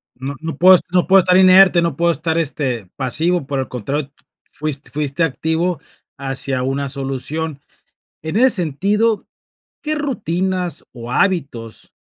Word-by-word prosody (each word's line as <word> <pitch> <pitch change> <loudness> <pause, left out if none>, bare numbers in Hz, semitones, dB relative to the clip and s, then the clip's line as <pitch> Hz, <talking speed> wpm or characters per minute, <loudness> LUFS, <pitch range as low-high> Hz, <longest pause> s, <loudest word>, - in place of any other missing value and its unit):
No 135 +2 -6
no 160 -3 -5
puedo 185 +2 +7
no 180 -1 +2
puedo 195 0 +6
estar 180 0 +3
inerte, 185 -1 +6
no 165 -5 -1
puedo 170 +1 +2
estar, 160 +2 -2
este, 130 - -2
pasivo, 155 +5 0
por 140 -2 -2
el 130 - -3
contrario, 135 +4 -4 0.4
fuis 145 -2 -3
fuiste 145 +2 -1
activo 160 +2 -1 0.4
hacia 135 -1 -1
una 135 +1 -2
solución. 140 +3 -4 0.6
En 160 +3 -5
ese 260 +2 +5
sentido, 200 +7 +1 0.6
¿qué 305 0 -1
rutinas 185 - -2
o 120 0 -8
hábitos 140 - -2
160 Hz, 140 wpm, -18 LUFS, 135-180 Hz, 0.6 s, puedo